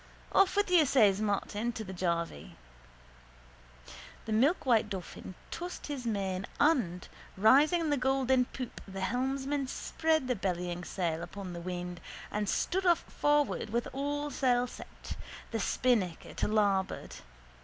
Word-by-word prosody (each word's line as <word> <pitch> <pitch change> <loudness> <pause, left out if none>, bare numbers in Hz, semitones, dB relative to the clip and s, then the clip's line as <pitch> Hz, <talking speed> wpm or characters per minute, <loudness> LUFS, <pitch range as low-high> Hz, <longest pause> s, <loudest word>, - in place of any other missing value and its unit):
—Off 390 -1 +4
with 410 -2 +1
you, 345 -3 +7
says 215 -8 +4
Martin 210 +2 -1
to 225 -1 -5
the 190 -2 -7
jarvey. 170 - -2 1.7
The 220 - -5
milkwhite 240 - +3
dolphin 185 -1 -7 0.2
tossed 355 +1 -5
his 275 -5 -4
mane 195 -3 -1
and, 235 - +2 0.3
rising 285 - +5
in 320 - 0
the 290 - +2
golden 265 -1 +2
poop 250 -1 -7
the 195 0 -6
helmsman 265 +5 -1
spread 315 +1 0
the 250 - +1
bellying 180 -3 -2
sail 170 -2 -2
upon 185 +1 -7
the 170 - -6
wind 180 0 -5 0.3
and 210 -1 -1
stood 380 +2 0
off 345 -1 +5
forward 295 -5 +1
with 235 +2 -1
all 290 +2 -2
sail 250 -2 +2
set, 250 - -9 0.4
the 225 - -1
spinnaker 205 -6 0
to - - -1
larboard. 205 -3 0
230 Hz, 140 wpm, -31 LUFS, 190-275 Hz, 1.7 s, you